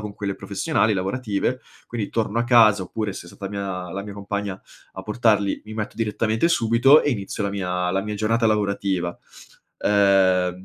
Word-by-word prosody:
con 105 -1 -7
quelle 100 -2 -3
professionali, 105 +1 0
lavorative. 105 +5 -2 0.3
Quindi 115 -4 -4
torno 115 0 -1
a 120 - +1
casa, 110 -5 +5
oppure 105 +2 -4
se 85 - -9
è - - -12
stata 100 +2 -8
mia 95 -3 -4
la 100 +1 -4
mia 100 -1 -8
compagna 100 -1 -4 0.4
a 95 - -7
portarli, 105 -2 +1
mi 110 - -8
metto 110 -1 -4
direttamente 110 +5 0
subito 120 0 +5
e 145 - +1
inizio 100 -2 -3
la 100 - -1
mia 90 -2 -2
la 95 - 0
mia 105 +1 -4
giornata 115 +2 +1
lavorativa. 100 -4 0 0.6
Ehm, 95 -3 +3
100 Hz, 175 wpm, -23 LUFS, 95-110 Hz, 0.6 s, casa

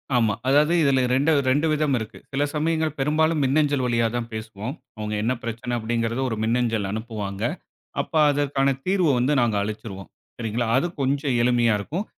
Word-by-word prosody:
ஆமா, 115 -4 +3
அதாவது 150 +4 +4
இதுல 135 -3 +3
2, 140 +5 +3 0.2
2 150 +5 +2
விதம் 150 -2 +1
இருக்கு. 110 -1 -7
சில 140 +2 0
சமயங்கள் 160 0 0
பெரும்பாலும் 155 +2 +2
மின்னஞ்சல் 145 0 +2
வழியா 115 -1 +1
தான் 120 -1 -3
பேசுவோம். 110 +3 -6 0.2
அவங்க 105 0 -4
என்ன 120 - +1
பிரச்சனை 115 +1 -4
அப்டிங்கிறது 115 +2 -1
ஒரு 110 - -2
மின்னஞ்சல் 115 -3 0
அனுப்புவாங்க. 105 -2 -5 0.6
அப்ப - - -5 0.2
அதற்கான 140 -1 +1
தீர்வு 185 -5 +2
வந்து 125 +4 +2
நாங்க 115 -4 +1
அளிச்சிருவோம். 100 -2 -6 0.3
சரிங்களா? 115 +1 -2
அது 155 +7 +2
கொஞ்சம் 135 -1 0
எளிமையா 120 -2 +3
இருக்கும். 165 - -4
125 Hz, 160 wpm, -24 LUFS, 115-145 Hz, 0.6 s, அதாவது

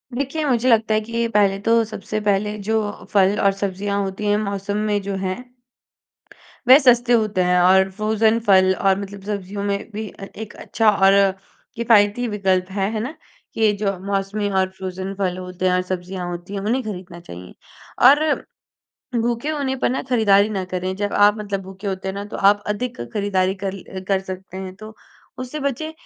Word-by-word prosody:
देखिए, 280 +4 -2
मुझे 255 -2 +2
लगता 220 -2 +3
है 215 - +3
कि 230 0 -1
पहले 205 -3 +2
तो 230 +1 +3
सबसे 215 0 -5
पहले 210 +1 +1
जो 220 - +2 0.4
फल 200 0 +4
और 200 - +5
सब्जियाँ 200 +1 -2
होती 195 +2 -4
हैं, 205 0 +3
मौसम 200 -1 -3
में 205 -1 +1
जो 200 0 -4
हैं 185 0 -2 1.3
वह 260 - +10
सस्ते 245 -2 +4
होते 215 -5 +2
हैं 180 0 +3
और 190 +1 +5
फ्रोजन 220 +2 +1
फल 190 -1 +5
और 195 +1 +2
मतलब 200 0 -8
सब्जियों 200 -1 -4
में 200 0 -2
भी 215 +1 -4
अ, 195 - -10
एक 220 -1 -8
अच्छा 225 -2 +1
और 195 -1 +4 0.6
किफायती 225 0 +3
विकल्प 190 -3 0
है, 195 0 -1
है 220 - -2
ना? 265 +8 -4 0.4
कि 220 -2 +3
जो 195 -2 -1
मौसमी 200 +1 -1
और 190 0 +1
फ्रोजन 190 0 -6
फल 185 -2 -1
होते 180 0 -5
हैं 180 - +2
और 180 - +2
सब्जियाँ 180 0 -5
होती 175 +3 -7
हैं, 195 - -3
उन्हें 240 +6 0
खरीदना 180 -5 -7
चाहिए। 90 - -11 0.5
और 295 +2 +4 0.8
भूखे 240 +5 -1
होने 280 -3 -1
पर - - +3
ना 255 - -1
खरीदारी 215 -5 +3
ना 195 -3 -2
करें, 185 +1 -2
जब 205 +1 -2
आप 205 +1 +5
मतलब 200 -2 -3
भूखे 190 +2 -8
होते 190 0 -3
हैं 190 - -2
ना 200 - -4
तो - - -5
आप 205 +1 +4
अधिक 210 - -3
खरीदारी 195 -2 0
कल 195 0 -3
अ, 190 - -8
कर 195 -1 +2
सकते 190 0 -8
हैं, 190 -1 -7
तो 215 +2 -11 0.4
उससे 255 +4 -5
बचें। 280 +3 -2
200 Hz, 190 wpm, -21 LUFS, 190-220 Hz, 1.3 s, वह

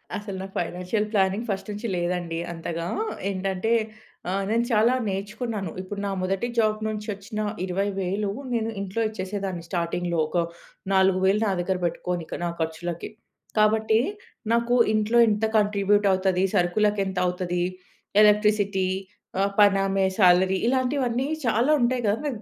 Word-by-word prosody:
అసలు 205 -2 -5
నాకు 195 0 -8
financial 180 +5 -2
planning 200 +3 +1
first 195 +1 -3
నుంచి 210 +3 -4
లేదండి 175 -1 -2
అంతగా. 165 0 -4 0.4
ఏంటంటే, 195 +2 -1 0.6
ఆ! - - 0 0.2
నేను 230 +2 +2
చాలా 225 +3 +4
నేర్చుకున్నాను. 200 -1 -3
ఇప్పుడు 200 +2 -6
నా 200 - -1
మొదటి 195 +5 -1
జాబ్ 215 -1 +2
నుంచొచ్చిన 210 -1 -5 0.3
20,000 195 +1 -1 0.2
నేను 225 -1 0
ఇంట్లో 200 +3 -3
ఇచ్చేసేదాన్ని. 190 -3 -4
స్టార్టింగ్‌లో 175 -1 -1
ఒక 170 +2 0 0.5
4,000 190 +2 +3
నా - - +2
దగ్గర 185 +1 -1
బెట్టుకోని 175 0 -2
ఇక - - -5
నా - - 0
ఖర్చులకి. 165 +1 -3 0.5
కాబట్టి, 220 +1 +3 0.5
నాకు 235 +1 +2 0.2
ఇంట్లో 215 +2 +2
ఇంత 210 +1 +1
కాంట్రిబ్యూట్ 205 0 +2
అవుతది? 185 -1 +1
సరుకులకెంతవుతది? 180 -2 +1 0.6
ఎలక్ట్రిసిటీ? 210 -2 +3 0.5
ఆ! - - +4 0.2
పనామె 195 -1 +4
శాలరీ? 185 0 +5
ఇలాంటివన్నీ, 260 0 0 0.2
చాలా 235 +5 +2
ఉంటయి 245 0 +1
గదా! 210 +3 +1
నాకు 240 -7 -4
195 Hz, 125 wpm, -25 LUFS, 185-215 Hz, 0.6 s, శాలరీ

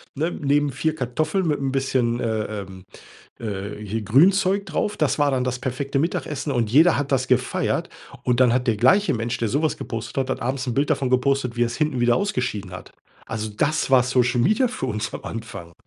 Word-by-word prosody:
ne, 160 +5 -1
neben 145 0 +1
4 155 +4 -1
Kartoffeln 155 +8 -1
mit 150 -2 0
'n 135 -1 -1
bisschen, 130 -3 0
äh, 110 -2 -1 0.2
ähm, 95 -1 -11 0.6
äh, 100 -2 -5
hier 110 +3 -3
Grünzeug 185 - +3
drauf. 200 +5 -2
Das 150 -1 0
war 145 -1 +3
dann 130 -1 0
das 130 0 -2
perfekte 135 +2 -2
Mittagessen, 155 -3 -2
und 115 -4 0
jeder 160 +6 +6
hat 140 -1 -2
das 130 0 +1
gefeiert. 125 0 0 0.3
Und 125 0 +1
dann 125 -2 +5
hat 125 0 0
der 115 -3 +2
gleiche 190 - +4
Mensch, 115 +1 -2
der 115 - -1
so 145 +8 0
was 155 - 0
gepostet 115 +2 -6
hat 130 0 -1
hat - - -3
abends 130 +2 -2
'n 120 - -2
Bild 145 +2 +1
davon 130 -2 0
gepostet, 130 -1 +1
wie 120 - +1
er's 120 0 0
hinten 155 -5 0
wieder 120 0 +3
ausgeschieden 125 - -2
hat. 90 - -10 0.3
Also 110 -1 -4
das 145 +7 0
war 130 -2 +6
Social 125 -1 +1
Media 215 - +3
für 180 - -4
uns 110 -2 -3
am - - -7
Anfang. 110 -7 -7
130 Hz, 210 wpm, -23 LUFS, 115-145 Hz, 0.6 s, jeder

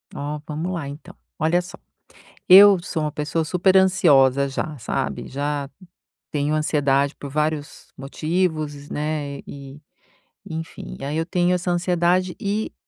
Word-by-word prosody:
Ó, 150 +1 -4
vamos 160 +4 -3
lá, 155 -5 -4
então. 165 +5 -11 0.2
Olha 170 +3 +2
só, 180 - -11 0.7
eu 195 +1 +9
sou 160 -3 -3
uma 150 - -2
pessoa 155 +2 -2
superansiosa 175 -7 +4
já, 150 +3 -4
sabe, 70 - -3
já 145 0 -3 0.6
tenho 150 +1 -1
ansiedade 140 -2 +1
por 140 - -8
vários 150 0 -3
motivos, 155 0 -2
né, 150 -2 -3
e 140 +1 -10 0.7
enfim, 165 -3 -7
aí 145 +3 -3
eu 160 - 0
tenho 180 0 +1
essa 180 0 -2
ansiedade 175 +1 +1
e 210 0 -2
155 Hz, 130 wpm, -22 LUFS, 145-180 Hz, 0.7 s, eu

